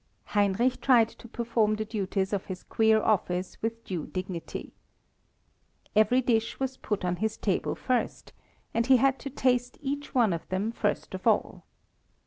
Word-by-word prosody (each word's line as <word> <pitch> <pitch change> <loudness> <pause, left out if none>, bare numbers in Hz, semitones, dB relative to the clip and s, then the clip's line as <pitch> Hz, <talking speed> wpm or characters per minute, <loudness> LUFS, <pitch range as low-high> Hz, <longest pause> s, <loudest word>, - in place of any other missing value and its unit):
Heinrich 205 +5 +2
tried 235 -4 +5
to - - -14
perform 230 -2 +1
the 215 0 -3
duties 195 -2 -2
of 195 - -1
his 185 -1 -6
queer 220 -1 +3
office 180 -3 0
with 230 +1 -3
due 175 -5 -4
dignity. 185 -2 -5 1.2
Every 220 +4 +5
dish 230 -2 +1
was 265 -1 -2
put 210 -3 -2
on 180 0 0
his 220 +2 -1
table 195 -4 0
first, 255 -1 -2 0.4
and 230 +1 +1
he 260 -1 +7
had 270 +1 +2
to 280 - -5
taste 250 -2 0
each 285 -1 -4
one 230 -7 +4
of 165 - -6
them 195 +4 -1
first - - -2
of - - -4
all. - - +1
220 Hz, 160 wpm, -28 LUFS, 195-245 Hz, 1.2 s, he